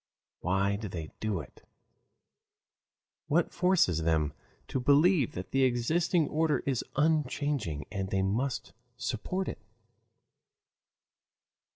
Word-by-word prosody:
Why 100 +2 +1
do 105 0 -5
they 80 -4 -6
do 105 -6 -1
it? 70 - -15 1.7
What 165 +3 +2
forces 175 - +3
them 80 -2 +1 0.4
to - - -1
believe 145 - +4
that 90 +1 -6
the 135 - +2
existing 155 +7 +2
order 155 0 +1
is 135 -4 0
unchanging 145 - 0
and 95 -2 -3
they 95 0 +1
must 115 +6 -1 0.2
support 185 +8 -2
it? - - -5
125 Hz, 105 wpm, -30 LUFS, 95-155 Hz, 1.7 s, believe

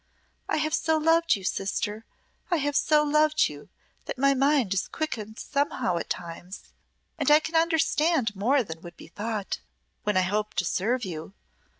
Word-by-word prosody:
"I - - +1
have 310 0 -1
so 320 -1 +2
loved 325 +2 +3
you, 195 - -8
sister 205 +3 -2 0.4
I 350 - +3
have 290 -1 -1
so 300 0 +4
loved 305 +1 +3
you - - -11 0.4
that - - -5
my 275 +1 +4
mind 275 -6 +2
is 195 - -1
quickened 220 -8 -4
somehow 265 -9 -1
at - - -4
times, 175 +2 -6 0.6
and 290 - +2
I 300 +1 +8
can 320 +1 -6
understand 320 -7 +2
more 250 +7 +2
than 165 -5 -8
would 175 -1 -11
be - - -13
thought 210 +1 -4 0.4
when 210 -2 0
I - - +5
hope 210 +3 -1
to 175 +1 0
serve 230 +8 0
you. 175 +2 -7
250 Hz, 175 wpm, -27 LUFS, 195-305 Hz, 0.6 s, I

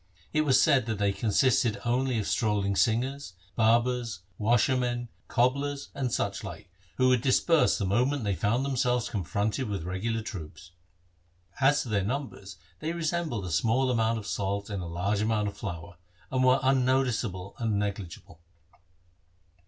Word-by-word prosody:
It 155 - +3
was 135 -3 +4
said 135 -6 +4
that 110 -2 -2
they 100 0 +2
consisted 115 +1 +2
only 125 +1 +1
of 105 - -1
strolling 105 -3 0
singers, 125 +1 0 0.2
barbers, 115 -3 +1 0.2
washermen, 120 +2 +1 0.2
cobblers, 140 +3 0
and 135 -3 -2
such 100 -1 -2
like, 95 -1 -9 0.3
who 130 0 +4
would 125 -2 +3
disperse 150 +5 +3
the 100 - -1
moment 125 +7 +1
they 100 -1 0
found 110 - 0
themselves 125 -3 0
confronted 105 +4 -1
with 100 -5 -3
regular 110 +6 -2
troops. 90 -4 -8 0.9
As 140 +2 +4
to 120 - -8
their 100 -3 +1
numbers 105 -5 -5 0.2
they 160 +2 -3
resembled 160 - -2
a 90 - -5
small 115 +9 +2
amount 115 -1 +1
of 110 - -7
salt 100 +1 -2
in 100 - -3
a 90 - -5
large 100 +5 -1
amount 105 -1 +1
of 100 - -11
flour, 85 -2 -7 0.3
and 130 -1 +1
were 130 +1 +5
unnoticeable 125 -7 +1
and 110 -3 0
negligeable. 100 -5 -5
115 Hz, 150 wpm, -28 LUFS, 100-130 Hz, 0.9 s, were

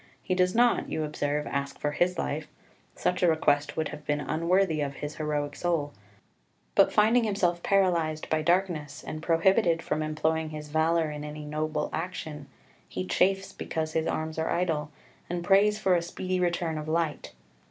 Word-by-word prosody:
He 185 - -1
does 185 +1 +2
not, 240 +1 +3
you 155 - -1
observe, 150 -1 -1
ask 140 0 -3
for 150 - -1
his 175 +4 +1
life 155 -1 -2 0.5
such 180 0 0
a 180 - +5
request 145 -3 +2
would 160 -1 0
have 150 - -8
been 145 0 0
unworthy 165 +2 +1
of 140 -1 -2
his 150 +1 -6
heroic 150 -2 -2
soul 165 -5 -1 0.8
but - - +5
finding 225 +3 +4
himself 180 -5 +1
paralysed 170 -6 +1
by 155 0 +1
darkness, 170 -3 0
and 155 - -5
prohibited 165 +1 +3
from 155 - -1
employing 155 +1 0
his 150 -1 -7
valour 160 +1 +2
in 150 0 -6
any 150 0 -7
noble 155 0 -2
action, 155 -4 -5 0.4
he 90 - -4
chafes 190 - +1
because 160 -1 -3
his 160 0 0
arms 160 0 -2
are 160 - 0
idle, 160 -4 0 0.4
and 175 0 -2
prays 200 +3 +4
for 190 -3 +2
a 175 - +3
speedy 185 +2 -3
return 170 -3 0
of 150 - -6
light. 160 -2 -1
160 Hz, 175 wpm, -28 LUFS, 150-180 Hz, 0.8 s, a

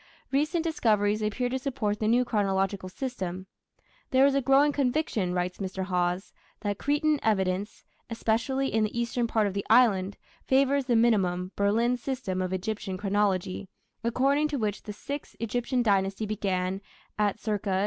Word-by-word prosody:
Recent 305 +5 +1
discoveries 215 -10 +1
appear 215 +4 -1
to 260 +1 -2
support 245 -6 -2
the 215 - 0
new 245 +3 +3
chronological 195 -3 0
system. 185 -5 -5 0.6
"There 265 +1 +5
is 280 - +4
a 275 - +2
growing 275 +3 +4
conviction", 255 - 0
writes 180 0 -2
Mr. 190 -1 -3
Hawes, 180 0 -1 0.3
"that 205 -1 -2
Cretan 295 +1 +1
evidence, 195 -1 0 0.3
especially 235 +4 0
in 220 0 +3
the 215 +2 -2
eastern 235 0 0
part 220 -2 +1
of 200 - -1
the 200 0 -2
island, 200 -6 +4 0.3
favours 275 +1 +2
the 245 -2 +2
minimum 190 -6 +2
(Berlin) 230 +5 +2
system 245 -8 -3
of 185 0 -2
Egyptian 190 0 -3
chronology, 195 -2 0 0.3
according 275 +6 +2
to 295 -2 -3
which 210 -4 -2
the 210 - -7
Sixth 280 +7 -7
(Egyptian) 245 +2 -1
Dynasty 195 0 +1
began 190 -2 -1 0.4
at 205 -2 +1
c. 215 0 -1
215 Hz, 155 wpm, -28 LUFS, 195-255 Hz, 0.6 s, There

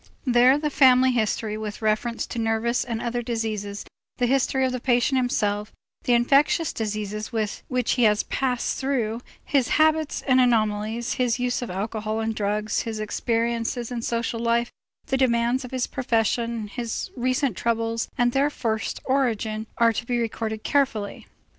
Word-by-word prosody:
There 250 +2 +5
the 300 0 -2
family 260 -2 +5
history 215 -2 -1
with 215 0 -6
reference 220 +2 0
to 240 - -5
nervous 225 +2 +1
and 230 -2 -3
other 240 +1 -2
diseases, 215 -4 -3 0.3
the 245 - +2
history 265 +1 +2
of 260 - 0
the 255 - -3
patient 245 +2 +2
himself, 210 -4 0 0.3
the 245 - +3
infectious 275 +6 +3
diseases 215 -1 -3
which 230 +2 -2
he 245 - +2
has 210 -1 +3
passed 250 -3 -1
through, 245 -4 -1 0.2
his 270 -4 +2
habits 315 -1 +2
and 260 -2 +4
anomalies, 220 -1 +1
his 245 -2 +1
use 250 0 -1
of 245 - -4
alcohol 215 +3 -3
and 225 0 -1
of - - -6
drugs, 210 +1 0
his 220 -1 -4
experiences 230 +2 -1
in 240 -1 -3
social 230 0 -2
life, 235 +1 +1 0.3
the 265 - 0
demands 245 0 +2
of 250 - -7
his 255 -1 -1
profession, 230 -2 -1
his 230 +2 -4
recent 255 -1 0
troubles 230 +1 -1
and 245 0 +3
their 275 +3 +2
first 220 -6 -3
origin 225 -5 0
are 230 -1 +4
to 235 +2 -4
be 245 - 0
recorded 220 -2 -3
carefully. 250 -8 0
235 Hz, 160 wpm, -24 LUFS, 220-250 Hz, 0.3 s, There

